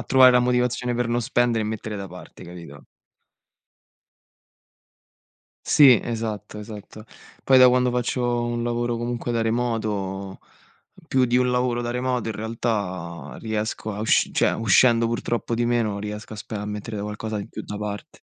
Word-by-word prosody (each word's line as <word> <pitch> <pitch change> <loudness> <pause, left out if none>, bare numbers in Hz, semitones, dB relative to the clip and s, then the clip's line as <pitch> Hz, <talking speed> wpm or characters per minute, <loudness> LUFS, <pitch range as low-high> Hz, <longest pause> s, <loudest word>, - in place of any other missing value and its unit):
a - - -4
trovare 130 -1 +6
la 125 - +5
motivazione 125 0 0
per 120 -1 0
non 120 +1 0
spendere 120 -2 +1
e - - -3
mettere 110 0 -5
da 100 -1 -6
parte, 90 +1 -12
capito? 85 -5 -11 2.8
Sì, 135 -5 +7
esatto, 110 -2 -4
esatto. 105 0 -10 0.4
Poi 130 -1 +5
da 125 0 +8
quando 125 0 +2
faccio 120 0 -1
un 120 0 -2
lavoro 120 0 -1
comunque 120 0 -3
da 115 - 0
remoto, 105 -5 -2 0.7
più 130 -1 +2
di 125 0 +2
un 125 0 +2
lavoro 125 -1 0
da 120 - -3
remoto 125 -1 -1
in 110 - -3
realtà 100 -6 -4
riesco 110 -1 -3
a 105 - -5
usc 110 - +3
cioè - - +2
uscendo 115 +2 +4
purtroppo 120 0 -2
di 120 0 0
meno 115 -4 0
riesco 105 +1 -6
a - - -7
spen 105 0 -6
a 105 - -5
mettere 105 +1 -5
qualcosa 105 +1 -4
di 100 - -5
più - - -7
da 105 - -6
parte. 105 -1 -6
115 Hz, 165 wpm, -23 LUFS, 105-120 Hz, 2.8 s, da